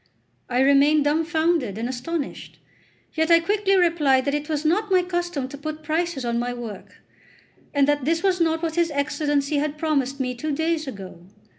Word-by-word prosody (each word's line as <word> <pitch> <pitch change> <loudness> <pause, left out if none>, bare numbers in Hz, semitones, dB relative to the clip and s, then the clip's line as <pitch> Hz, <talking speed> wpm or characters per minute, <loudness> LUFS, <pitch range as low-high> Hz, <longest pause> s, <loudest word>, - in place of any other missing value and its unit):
I 250 +1 +1
remained 280 +2 +4
dumbfounded 315 - 0
and 230 +2 -2
astonished; 275 +5 -5 0.6
yet 320 +1 0
I 335 0 +7
quickly 395 +3 +1
replied 300 -7 +3
that 280 - 0
it 295 +1 -3
was 305 0 -2
not 405 +7 +1
my 370 -1 +3
custom 350 -6 -2
to 285 - -9
put 310 +1 -6
prices 315 -3 -2
on 235 0 0
my 245 0 -2
work, 230 -5 -9 0.7
and 280 -1 +2
that 290 -1 +1
this 330 +5 0
was 370 -2 +2
not 325 0 +1
what 325 0 -2
his 340 -1 +2
Excellency 290 0 -1
had 295 +1 -1
promised 280 -4 -1
me 250 -1 -1
two 295 +5 -3
days 320 0 -1
ago. 190 -7 -9
300 Hz, 180 wpm, -23 LUFS, 275-330 Hz, 0.7 s, I